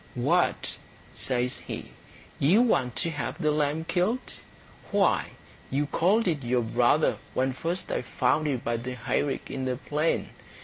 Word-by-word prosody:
"What," 145 +9 +1 0.4
says 125 -1 -1
he, - - -7 0.5
"you 190 - +5
want 130 - +1
to 170 - 0
have 145 -2 -4
the 155 - +2
lamb 150 +1 0
killed? 190 +9 0 0.6
Why, - - +2 0.4
you 145 +2 +1
called 195 +9 +2
it 155 -5 +1
your 120 0 +1
brother 120 +6 +3 0.2
when 130 0 +1
first 170 +7 -3
I - - 0
found 155 0 +1
you 140 -3 +1
by 120 0 -2
the 125 +2 -5
hayrick 135 +3 -1
in 135 -1 -3
the 130 -1 0
plain. 150 +5 -1
145 Hz, 150 wpm, -27 LUFS, 125-165 Hz, 0.6 s, you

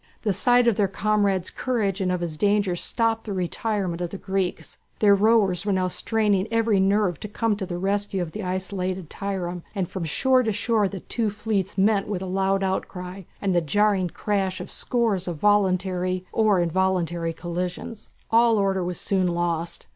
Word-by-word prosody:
The 210 -3 +1
sight 245 +4 +4
of 230 - +3
their 205 - +3
comrade's 200 -2 0
courage 210 -6 -1
and 185 -1 +1
of 180 -1 -1
his 165 -3 -3
danger 200 +1 +2
stopped 225 +4 0
the 210 - -4
retirement 185 -1 -2
of 175 - -2
the 195 - -6
Greeks. 190 -2 -3 0.2
Their 205 -2 +5
rowers 200 -3 +3
were 205 - 0
now 185 -1 +1
straining 210 -1 +1
every 230 -3 +2
nerve 195 -3 +2
to - - -6
come 215 +1 0
to 190 -3 -4
the 175 - -4
rescue 200 +1 -1
of 175 -3 -3
the 215 - -6
isolated 185 -2 -3
trireme, 180 -3 -4
and 190 -3 -1
from 180 -1 -5
shore 260 - +3
to 225 -3 0
shore 215 0 +1
the 190 -1 -7
two 230 -3 -1
fleets 205 -2 -2
met 200 +1 +3
with 195 -3 -3
loud 195 +1 0
outcry 190 0 -3 0.2
and 195 -2 0
the 175 - +3
jarring 195 +3 +2
crash 195 0 -1
of - - -6
scores 220 -7 0
of 170 -3 -3
voluntary 185 -1 +1
or 215 -4 +3
involuntary 175 -1 0
collisions. 180 +5 -5 0.2
All 230 0 +5
order 195 -2 +1
was 180 0 -3
soon 190 -2 +1
lost. 170 -1 -2
195 Hz, 180 wpm, -24 LUFS, 180-210 Hz, 0.2 s, Their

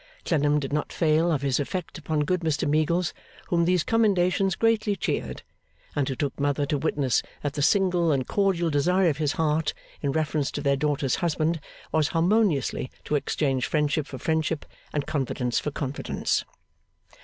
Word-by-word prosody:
Clennam 150 -2 +2
did 140 0 -4
not 150 - -1
fail 160 +1 +2
of 145 -4 0
his 135 -1 +1
effect 180 +6 -3
upon 155 -1 -1
good 180 +3 +1
Mr 160 -3 0
Meagles, 155 +4 +1 0.4
whom 170 -1 +2
these 180 -2 +2
commendations 195 -4 +2
greatly 225 -2 +2
cheered; - - -3 0.5
and 140 -2 0
who 135 - -2
took 140 +1 -3
Mother 145 0 +1
to 145 +1 0
witness 140 -4 +1 0.2
that 145 -1 -1
the 145 - -3
single 180 -1 +3
and 135 -3 +1
cordial 185 -5 +1
desire 180 +5 +3
of 145 - -1
his 150 -2 0
heart 155 0 0 0.3
in 140 - 0
reference 155 -1 0
to 145 - -3
their 140 -1 +2
daughter's 145 -1 0
husband, 165 -1 0 0.3
was 155 -2 +2
harmoniously 170 - +1 0.2
to - - -3
exchange 135 -2 0
friendship 150 -1 0
for 130 - -7
friendship, 160 +1 -1 0.3
and 145 -2 -1
confidence 130 -4 -1
for - - -3
confidence. 140 -1 -2
155 Hz, 165 wpm, -26 LUFS, 145-175 Hz, 0.5 s, single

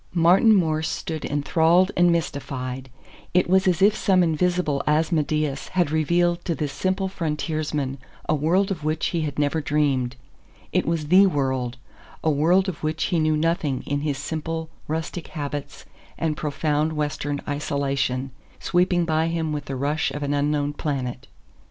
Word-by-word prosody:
Martin 180 +6 +6
Morse 160 -4 +1
stood 160 -2 -4
enthralled 165 +5 +3
and 175 0 +4
mystified. 135 -5 -3 0.5
It 180 - +4
was 190 +2 +3
as 180 0 +2
if 210 +1 +5
some 185 -2 +3
invisible 165 -3 +1
Asmodeus 155 -2 +1
had 175 -5 0
revealed 170 +2 +1
to 170 - 0
this 145 -1 -3
simple 185 +6 -1
frontiersman 150 -5 -2 0.3
a - - +2
world 175 +7 +2
of 165 -6 -4
which 155 +1 -1
he 170 - -1
had 150 -3 -3
never 150 +2 +1
dreamed. 140 -4 0 0.6
It - - +1
was 160 -3 -1
THE 190 +3 +7
world 130 -6 -1 0.5
a 160 - +3
world 170 +7 +3
of 185 -5 -4
which 155 +1 -1
he 170 - +3
knew 155 -1 +2
nothing 155 -4 0
in 145 0 -1
his 145 -2 -1
simple, 160 +2 -4 0.2
rustic 160 +2 -4
habits 145 -1 -6 0.3
and 160 -2 -1
profound 150 +1 -1
Western 145 -1 -2
isolation 140 -2 -1 0.3
sweeping 175 -1 +2
by 160 0 +1
him 165 -2 -1
with 145 -2 -4
the 135 - -4
rush 145 +4 0
of 145 - -5
an 145 0 -1
unknown 145 0 0
planet. 130 -5 -3
155 Hz, 160 wpm, -24 LUFS, 145-170 Hz, 0.6 s, THE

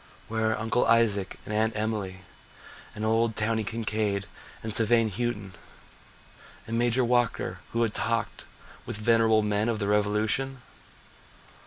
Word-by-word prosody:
Where 110 0 0
are - - -3
Uncle 115 +3 +1
Isaac 110 -4 +2
and 105 - -5
Aunt 110 +1 +1
Emily, 105 -3 -3 0.7
And 105 - -3
old 110 0 +2
Towny 110 +1 0
Kincaid 105 -2 -1 0.4
and 110 -1 -3
Sevigne 115 0 +3
Houghton, 105 -2 -3 1.1
And 115 - -4
Major 120 +1 +2
Walker 120 -6 0
who 115 0 +1
had 110 -2 0
talked 115 -1 -1 0.4
With - - -3
venerable 110 0 +3
men 105 +2 +1
of 115 - 0
the 100 -1 -2
revolution? 105 +6 +1
110 Hz, 135 wpm, -27 LUFS, 105-115 Hz, 1.1 s, Sevigne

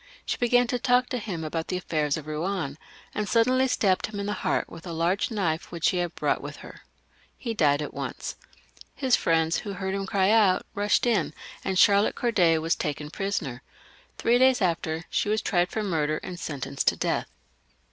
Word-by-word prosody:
She - - -1
began 245 0 +3
to 245 +1 -2
talk 245 +1 +3
to 250 - -2
him 185 -7 -5
about 160 +1 -3
the 180 - -1
affairs 155 -5 -1
of 155 - -7
Eouen, 155 -1 -3 0.4
and 210 -2 -2
suddenly 255 +3 +3
stabbed 195 -7 +1
him 210 -2 -6
in 200 - -3
the 205 - -1
heart 185 - -1
with 165 - -11
a 170 - -4
large 175 - +1
knife 175 -8 -2
which 170 -2 +1
.she 185 - -1
had 175 -1 -2
brought - - 0
with - - -7
her. - - -12 0.6
He 230 -3 -3
died 150 -7 +2
at - - -6
once. - - -5 0.6
His 260 -3 +3
friends, 165 0 +2
who 205 - -5
heard 190 0 -3
him 195 0 -2
cry 195 -1 +2
out, 205 -5 +4
rushed 205 +3 +2
in, 205 -10 +1 0.3
and 190 -1 -1
Charlotte 200 +2 +5
Corday 180 -9 +3
was 165 +2 +1
taken 150 -1 -4
prisoner. 165 -12 -3 0.6
Three 240 +1 +3
days 260 -1 +5
afterwards 165 -3 -1
she 205 - 0
was 215 +1 +2
tried 175 -2 +1
for 220 - -2
murder, 155 -5 0
and 180 -1 -6
sentenced 140 -3 -4
to - - +5
death. - - -1
185 Hz, 200 wpm, -26 LUFS, 160-215 Hz, 0.6 s, Charlotte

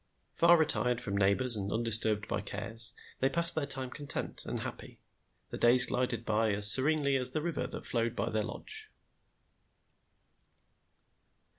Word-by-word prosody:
Far 170 +1 +3
retired 125 -6 -1
from 100 -3 -5
neighbors 100 +5 0
and 100 -1 -6
undisturbed 110 -2 0
by - - -4
cares,' 115 -1 -4 0.2
they 135 - 0
passed 170 +4 +7
their 145 -3 -4
time 130 -2 -2
content 145 +1 -6
and - - -6
happy. - - -10 0.5
The - - -9
days 125 +2 +3
glided 125 -2 -4
by 110 0 -1
as 105 +1 +10
serenely 140 +2 0
as 130 -1 -4
the 155 +4 -5
river 170 -3 -5
that - - -9
flowed 115 0 -3
by - - -4
their 110 0 -2
lodge. 435 - -7
125 Hz, 150 wpm, -29 LUFS, 110-140 Hz, 0.5 s, as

